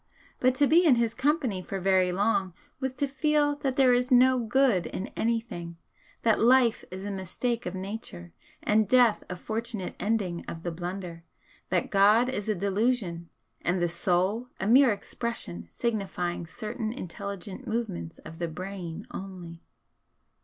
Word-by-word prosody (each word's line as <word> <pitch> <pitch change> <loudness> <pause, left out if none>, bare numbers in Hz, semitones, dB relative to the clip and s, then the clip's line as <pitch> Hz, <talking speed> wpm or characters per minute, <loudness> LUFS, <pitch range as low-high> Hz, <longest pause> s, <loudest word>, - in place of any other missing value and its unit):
But 255 0 +3
to 285 - +4
be 330 +5 +5
in 300 -7 +6
his 230 -1 +1
company 260 - 0
for 195 +1 -5
very 185 -1 +3
long 195 -1 0 0.2
was 265 -1 -1
to 280 +2 0
feel 290 +1 +1
that 270 -3 -1
there 260 -2 +5
is 250 +1 +2
no 255 0 +5
good 235 -5 +2
in 190 - -5
anything 225 -8 -3 0.5
that 225 -2 +3
life 240 0 +4
is 190 +2 -7
a 205 - -3
mistake 200 +5 -2
of 180 - -4
Nature, 185 - -7 0.3
and 215 0 +3
death 245 -4 +5
a 180 - -3
fortunate 220 0 -4
ending 195 -4 -1
of 165 0 -7
the 175 - -2
blunder 175 0 -6 0.5
that 180 -1 0
God 210 +5 +5
is 215 -5 -3
a 215 - +2
delusion 195 -3 0 0.3
and 180 +2 0
the 175 - +2
'Soul' 185 +7 0
a - - -2
mere 250 +4 +6
expression 200 - -4
signifying 185 - -2
certain 215 +2 -4
intelligent 200 +2 -7
movements 220 - -3
of 160 +1 -11
the 170 - -1
brain 180 +1 -6
only. 180 -3 -8
205 Hz, 155 wpm, -28 LUFS, 180-245 Hz, 0.5 s, in